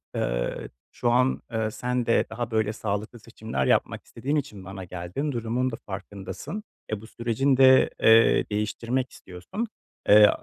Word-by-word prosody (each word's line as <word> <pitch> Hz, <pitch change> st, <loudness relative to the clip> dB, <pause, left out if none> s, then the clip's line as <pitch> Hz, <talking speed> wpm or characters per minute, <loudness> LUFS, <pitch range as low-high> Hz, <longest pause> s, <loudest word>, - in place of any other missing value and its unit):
eee, -, -, -2 dB, 0.2 s
şu 120 Hz, -, -1 dB
an, 125 Hz, +2 st, +2 dB
eee, 110 Hz, -1 st, -1 dB
sen 125 Hz, +1 st, -2 dB
de 115 Hz, -, +3 dB
daha 115 Hz, +1 st, -4 dB
böyle 110 Hz, -1 st, +1 dB
sağlıklı 110 Hz, +2 st, -4 dB
seçimler 110 Hz, -, -4 dB
yapmak -, -, +1 dB
istediğin 145 Hz, +3 st, -3 dB
için 110 Hz, -10 st, -3 dB
bana 95 Hz, 0 st, -7 dB
geldin, 90 Hz, -, -4 dB
durumun 120 Hz, +2 st, -1 dB
da -, -, -4 dB
farkındasın, 100 Hz, -, -6 dB, 0.3 s
eee, 105 Hz, -1 st, -2 dB
bu 110 Hz, -, -12 dB
sürecin 120 Hz, +4 st, 0 dB
de, 130 Hz, 0 st, +7 dB
eee, 115 Hz, 0 st, +6 dB
değiştirmek 115 Hz, +5 st, -2 dB
istiyorsun. 95 Hz, -, -6 dB, 0.4 s
Eee, 105 Hz, 0 st, +9 dB
115 Hz, 150 wpm, -26 LUFS, 105-125 Hz, 0.4 s, Eee